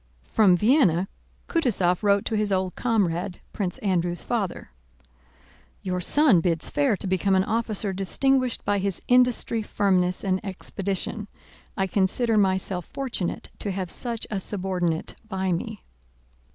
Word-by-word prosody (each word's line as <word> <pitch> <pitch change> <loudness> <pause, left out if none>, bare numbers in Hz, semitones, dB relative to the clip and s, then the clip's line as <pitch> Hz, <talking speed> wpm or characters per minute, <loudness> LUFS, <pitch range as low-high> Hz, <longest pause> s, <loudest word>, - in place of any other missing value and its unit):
From 195 -5 +4
Vienna 205 - +3 0.4
Kutúzov 195 - +1
wrote 200 -1 +3
to 225 - -1
his 210 -1 0
old 185 -1 0
comrade, 190 -6 0
Prince 190 -4 -2
Andrew's 175 -3 0
father. 210 - -3 1.1
Your 180 -1 -2
son 265 - +4
bids 165 -2 0
fair 275 -8 +2
to - - -4
become 190 +1 +2
an 190 - +4
officer 215 -2 -1
distinguished 255 +7 +1
by 205 0 +1
his 195 -1 -2
industry, 245 -2 +3
firmness, 185 -4 +1
and 190 0 0
expedition. 200 +2 -4 0.5
I 195 - +2
consider 200 +5 +1
myself 190 -3 +1
fortunate 250 -10 -4
to 205 - -3
have 185 -2 -3
such 235 -2 -4
a 205 - -1
subordinate 180 -4 -2 0.2
by 190 -2 -1
me. 210 +5 -3
195 Hz, 135 wpm, -25 LUFS, 185-220 Hz, 1.1 s, From